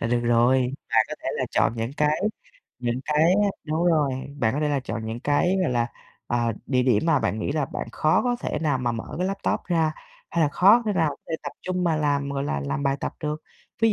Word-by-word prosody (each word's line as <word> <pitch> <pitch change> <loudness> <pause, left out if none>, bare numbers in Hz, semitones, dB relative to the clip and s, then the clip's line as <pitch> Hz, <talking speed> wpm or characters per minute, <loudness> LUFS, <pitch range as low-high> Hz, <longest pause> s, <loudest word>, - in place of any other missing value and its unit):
là - - -1
được 120 +1 +1
rồi. 125 +2 +3 0.2
Bạn - - +5
có - - -4
thể - - -2
là - - 0
chọn - - +2
những 115 +3 -3
cái 150 +1 +2 0.6
những 120 0 -2
cái 150 +2 +2 0.2
á 205 - +3 0.2
đúng 155 +2 -1
rồi, 155 -5 +3 0.3
bạn 110 -3 +1
có 145 - -1
thể 150 - +1
là 145 -2 +1
chọn 115 -3 -5
những 115 +2 -4
cái, 160 +8 +2
gọi 175 - +1
là, 120 -1 +1 0.4
ờ, 120 -1 0
địa 125 -2 +2
điểm 125 +2 +2
mà 165 -3 +4
bạn 110 -3 -1
nghĩ 125 - -2
là 150 -1 0
bạn - - -5
khó 155 +1 +2
có 245 -1 +1
thể - - -2
nào 145 -5 +1
mà 120 -2 0
mở 115 - -4
cái 180 - 0
laptop 195 +1 -1
ra 165 -3 +2 0.4
hay 170 -1 +1
là - - +2
khó 200 +10 +5
thể 210 - +2
nào 160 -6 +1
để 165 - -3
tập - - -5
trung 180 0 -1
mà 165 -2 +2
làm, 145 -2 0
gọi 140 0 -2
là, 70 - -1
làm 70 - -2
bài 135 -1 +1
tập - - -3
được. 150 +1 -3 0.4
Ví 225 -1 +4
145 Hz, 250 wpm, -25 LUFS, 120-160 Hz, 0.6 s, Bạn